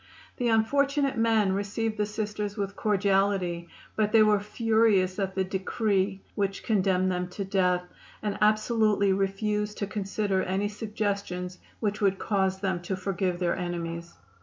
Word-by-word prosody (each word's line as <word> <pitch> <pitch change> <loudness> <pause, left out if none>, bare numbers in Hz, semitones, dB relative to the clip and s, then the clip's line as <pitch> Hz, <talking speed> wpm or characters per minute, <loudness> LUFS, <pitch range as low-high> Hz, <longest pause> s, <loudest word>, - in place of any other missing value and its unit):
The 245 - 0
unfortunate 275 +5 +2
men 225 -3 +3
received 210 +3 -2
the 210 0 0
Sisters 210 -1 -3
with 200 -1 -3
cordiality, 195 -4 +1 0.3
but 215 -1 +1
they 220 -1 +7
were 210 -1 +4
furious 210 -3 +2
at 190 -1 -2
the 190 - +1
decree 195 +1 -1
which 195 -1 -2
condemned 185 -3 +2
them 180 0 -1
to 195 +2 -5
death, 180 -2 +2 0.4
and 205 -1 -1
absolutely 215 -2 +3
refused 210 +2 -1
to 200 - -1
consider 200 -1 -1
any 195 +3 -1
suggestions 200 -4 -3 0.2
which 210 0 -1
would 195 -1 +3
cause 190 -2 0
them 190 -3 -1
to 180 +2 -3
forgive 185 -1 -1
their 175 -1 0
enemies. 170 -1 -4
200 Hz, 145 wpm, -27 LUFS, 190-215 Hz, 0.4 s, they